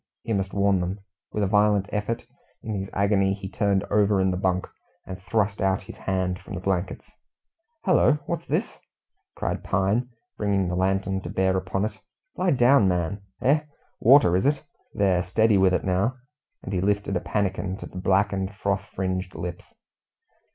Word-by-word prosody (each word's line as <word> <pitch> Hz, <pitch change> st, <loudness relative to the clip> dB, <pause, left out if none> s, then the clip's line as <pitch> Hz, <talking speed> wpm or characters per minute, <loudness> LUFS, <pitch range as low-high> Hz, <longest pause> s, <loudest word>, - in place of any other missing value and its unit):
He 115 Hz, -, -2 dB
must 95 Hz, -1 st, -1 dB
warn 100 Hz, -1 st, +2 dB
them. 90 Hz, +2 st, -2 dB, 0.3 s
With 105 Hz, -, -1 dB
a -, -, +2 dB
violent 105 Hz, -1 st, +3 dB
effort, 105 Hz, +2 st, -2 dB, 0.4 s
in 110 Hz, -, -4 dB
his 95 Hz, -1 st, -3 dB
agony 100 Hz, -1 st, +2 dB
he 95 Hz, -1 st, -7 dB
turned 100 Hz, 0 st, +1 dB
over 105 Hz, -1 st, +3 dB
in 95 Hz, 0 st, +2 dB
the -, -, -1 dB
bunk 95 Hz, -1 st, 0 dB, 0.4 s
and 95 Hz, -1 st, -8 dB
thrust 100 Hz, +1 st, 0 dB
out 95 Hz, -1 st, +1 dB
his -, -, -10 dB
hand 95 Hz, -1 st, -1 dB
from -, -, -9 dB
the -, -, -4 dB
blankets. 95 Hz, -1 st, -2 dB, 0.7 s
"Hullo! 180 Hz, -5 st, +5 dB
what's 170 Hz, -1 st, -4 dB
this?" -, -, -2 dB, 0.6 s
cried -, -, -3 dB
Pine, 100 Hz, +6 st, 0 dB, 0.3 s
bringing 100 Hz, -3 st, +1 dB
the 90 Hz, -, -2 dB
lantern 95 Hz, +1 st, 0 dB
to -, -, -7 dB
bear 95 Hz, 0 st, +1 dB
upon 95 Hz, +2 st, -1 dB
it. 110 Hz, -, -6 dB, 0.4 s
"Lie 185 Hz, -, +1 dB
down, 125 Hz, -3 st, +5 dB
my 90 Hz, -, +2 dB
man. 90 Hz, +4 st, -2 dB, 0.2 s
Eh! 140 Hz, +4 st, +4 dB, 0.4 s
water, 120 Hz, -8 st, +6 dB
is 95 Hz, +8 st, +2 dB
it? 145 Hz, 0 st, +1 dB, 0.3 s
There, 95 Hz, -3 st, +2 dB
steady 105 Hz, +3 st, +3 dB
with 95 Hz, -1 st, +5 dB
it 90 Hz, -, 0 dB
now"; 95 Hz, +7 st, +1 dB, 0.5 s
and -, -, -5 dB
he 90 Hz, -, 0 dB
lifted 100 Hz, 0 st, 0 dB
a -, -, +2 dB
pannikin 95 Hz, -1 st, -2 dB
to -, -, -8 dB
the 90 Hz, -, -8 dB
blackened, 95 Hz, +1 st, +1 dB
froth 100 Hz, -1 st, -1 dB
fringed 95 Hz, -1 st, -2 dB
lips. 90 Hz, 0 st, -6 dB
95 Hz, 180 wpm, -25 LUFS, 95-105 Hz, 0.7 s, water